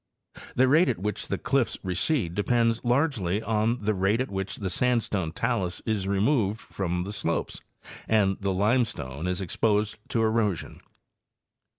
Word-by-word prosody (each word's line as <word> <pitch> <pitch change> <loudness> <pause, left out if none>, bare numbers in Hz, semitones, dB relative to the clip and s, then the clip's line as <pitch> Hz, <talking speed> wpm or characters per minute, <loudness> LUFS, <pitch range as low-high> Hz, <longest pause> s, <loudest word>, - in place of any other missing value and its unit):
The 130 +1 +4
rate 160 +7 +5
at - - 0
which 105 +3 -3
the 100 - -1
cliffs 125 -2 0
recede 95 - 0
depends 115 +3 +1
largely 120 - +1
on 110 +2 +1
the 110 +1 +2
rate 100 +4 +1
at 130 - -2
which 95 0 -3
the 95 -3 -3
sandstone 105 -7 0
talus 100 -2 -1
is 105 -4 -1
removed 105 +1 +1
from 90 -4 -3
the 100 - -5
slopes - - -2 0.5
and 100 -3 +3
the 100 - 0
limestone 95 - 0
is 90 +2 -1
exposed 105 +3 0
to 115 - +1
erosion. 110 -4 0
105 Hz, 150 wpm, -27 LUFS, 95-115 Hz, 0.5 s, rate